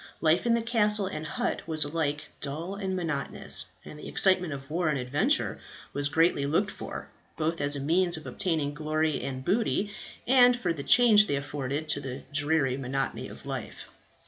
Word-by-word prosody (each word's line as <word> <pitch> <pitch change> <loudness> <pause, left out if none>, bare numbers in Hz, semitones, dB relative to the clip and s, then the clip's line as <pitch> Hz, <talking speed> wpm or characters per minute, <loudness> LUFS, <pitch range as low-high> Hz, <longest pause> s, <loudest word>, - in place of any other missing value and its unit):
Life 165 +7 +2
in 235 - +4
the 230 - -1
castle 210 -3 +2
and 155 -5 -5
hut - - -2
was 155 -2 +1
alike 150 -1 -3
dull 155 +6 -4
and 195 -2 -3
monotonous, 165 -6 +2 0.2
and 150 - -10
the - - -9
excitement 185 -3 +3
of 135 0 -7
war 170 0 0
and 150 - 0
adventure 145 - 0 0.3
was 145 0 0
greatly 160 -2 +2
looked 195 +8 +1
for, - - -8 0.3
both 165 +1 -1
as 145 0 +1
a - - -3
means 170 +4 +1
of 155 - -10
obtaining 155 -5 -1
glory 155 0 -1
and 130 -1 -5
booty, 205 0 0 0.3
and 250 -1 +6
for 180 -8 -1
the 150 - -6
change 215 - +6
they 140 - 0
afforded 140 +1 -4
to 155 - 0
the 135 -1 -7
dreary 145 -3 +1
monotony 135 0 -3
of - - -12
life. - - -6
155 Hz, 180 wpm, -28 LUFS, 145-190 Hz, 0.3 s, and